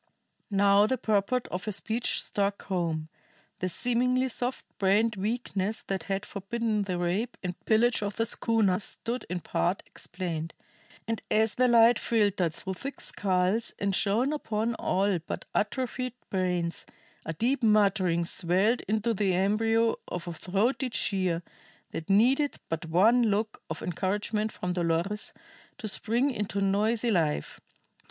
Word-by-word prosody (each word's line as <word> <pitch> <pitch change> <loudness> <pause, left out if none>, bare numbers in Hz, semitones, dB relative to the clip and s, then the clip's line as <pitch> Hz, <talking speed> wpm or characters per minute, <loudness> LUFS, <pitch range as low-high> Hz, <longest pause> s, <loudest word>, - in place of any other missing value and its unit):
Now 200 0 +4
the 260 - 0
purport 220 +3 0
of 180 +1 -4
her 215 - -1
speech 225 +4 -1
struck 200 0 -1
home; 165 -4 -2 0.5
the 185 - -1
seemingly 250 +5 +1
soft 245 +1 -2
brained 210 +3 +3
weakness 210 0 -2
that 190 -4 -3
had 195 +1 -1
forbidden 215 +2 -2
the 185 -3 -2
rape 185 +8 -1
and 180 -1 -2
pillage 230 +2 +3
of 205 -1 -3
the 225 - +1
schooner 220 -5 +2
stood 235 +4 -4
in 180 -1 -3
part 180 +4 -1
explained. 165 -3 -5 0.5
And 225 -1 -2
as 220 0 +3
the 255 0 +3
light 235 0 +6
filtered 205 -7 +1
through 190 - -5
thick 275 +9 -7
skulls 190 +3 0
and 200 -1 0
shone 230 +10 +2
upon 225 -5 -1
all 195 -3 +1
but 165 - -6
atrophied 255 +3 -1 0.2
brains, 180 -3 -1 0.4
a 165 - -4
deep 245 - 0
muttering 195 -6 +3
swelled 190 +7 +1
into 220 +3 +1
the 195 -3 +1
embryo 225 +4 +2
of 175 0 -5
a 175 - -3
throaty 230 - 0
cheer 185 -6 0 0.5
that 165 - -6
needed 255 +9 +4
but 165 +1 -3
one 210 +9 +5
look 215 -1 0
of 160 - -5
encouragement 210 +4 -1
from 180 0 -3
Dolores 175 +4 0 0.5
to 220 - -5
spring 235 +7 +1
into 205 -4 -2
noisy 215 +4 +1
life. 160 - 0
205 Hz, 145 wpm, -28 LUFS, 185-230 Hz, 0.5 s, light